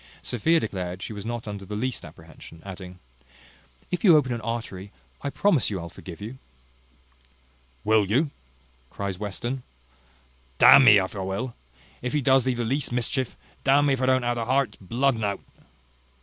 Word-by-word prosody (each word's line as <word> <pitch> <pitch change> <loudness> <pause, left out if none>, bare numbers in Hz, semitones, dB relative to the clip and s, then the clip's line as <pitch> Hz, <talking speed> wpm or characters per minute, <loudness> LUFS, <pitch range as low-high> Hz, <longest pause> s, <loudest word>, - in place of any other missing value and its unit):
Sophia 160 +8 +2
declared 90 - -4
she 110 - -5
was 105 +1 -7
not 120 -1 -4
under 100 -1 -6
the 105 +2 -6
least 125 +4 -2
apprehension; 85 - -13
adding, 90 -1 -9 0.9
"If 180 - -2
you 175 -7 +8
open 130 -4 +1
an 115 - -4
artery, 110 -4 -5 0.3
I 145 - -2
promise 165 - +2
you 100 -3 -3
I'll 85 -1 -7
forgive 85 -3 -10
you." 115 +6 -8 1.4
"Will 110 -2 +3
you?" 140 - +1 0.6
cries 100 +2 -5
Western: 120 +6 -4 1.0
"D - - +5
n 140 - +10
me, 105 -4 +9
if 95 +1 -1
I - - -4
will. 95 +7 -3 0.5
If 125 +2 -3
he 150 - +1
does 130 -1 +4
thee 130 -1 +1
the 120 -1 -2
least 135 +4 -1
mischief, 125 +1 -1 0.3
d - - -1
n 145 +2 +5
me 140 - +3
if 130 - -2
I 130 - +1
don't 130 -1 +3
ha' 120 0 +1
the 115 -1 -3
heart's 130 +1 +1
blood 125 +8 +1
o'un 110 -2 -5
out." 100 -1 -1
115 Hz, 185 wpm, -25 LUFS, 100-130 Hz, 1.4 s, n